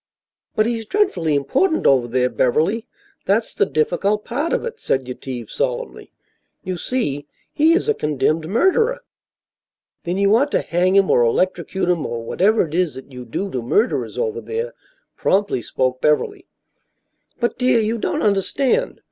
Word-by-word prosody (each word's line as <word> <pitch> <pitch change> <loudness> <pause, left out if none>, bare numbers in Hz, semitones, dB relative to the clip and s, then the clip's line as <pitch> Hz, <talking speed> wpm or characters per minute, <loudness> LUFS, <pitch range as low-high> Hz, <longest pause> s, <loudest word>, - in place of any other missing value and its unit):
"But 215 - +3
he's 230 -2 -2
dreadfully 180 - +1
important 275 - +1
over 130 -3 +4
there, 125 +1 +1
Beverly; 180 - +1 0.4
that's 220 +3 +1
the - - +1
difficult 195 +7 0
part 290 +7 -2
of - - 0
it," 465 -1 -6
said 130 - -1
Yetive, 125 -1 -6
solemnly. - - -3 0.5
"You 185 - -3
see, 145 - -2 0.3
he 320 +2 +4
is 355 - +1
a 445 - +3
condemned 155 - -1
murderer." 450 - +2 1.0
"Then, 175 +2 -2
you 200 +2 +4
ought 280 +5 +2
to - - +3
hang 180 +2 +1
him 195 -1 +4
or - - +4
electrocute 185 +9 0
him 175 -3 +1
or 115 -1 -4
whatever 195 - +2
it 150 - -11
is 175 -3 0
that 130 +1 -11
you 125 -1 -9
do 195 - -4
to 125 - -2
murderers 210 - 0
over 455 -1 -2
there," 470 +2 -4 0.4
promptly 195 -10 +1
spoke 130 +2 -1
Beverly. 360 - 0 0.9
"But, 240 -1 -1
dear, 250 -2 +3
you 225 +1 -1
don't - - -1
understand. 255 - +1
195 Hz, 160 wpm, -20 LUFS, -, 1.0 s, over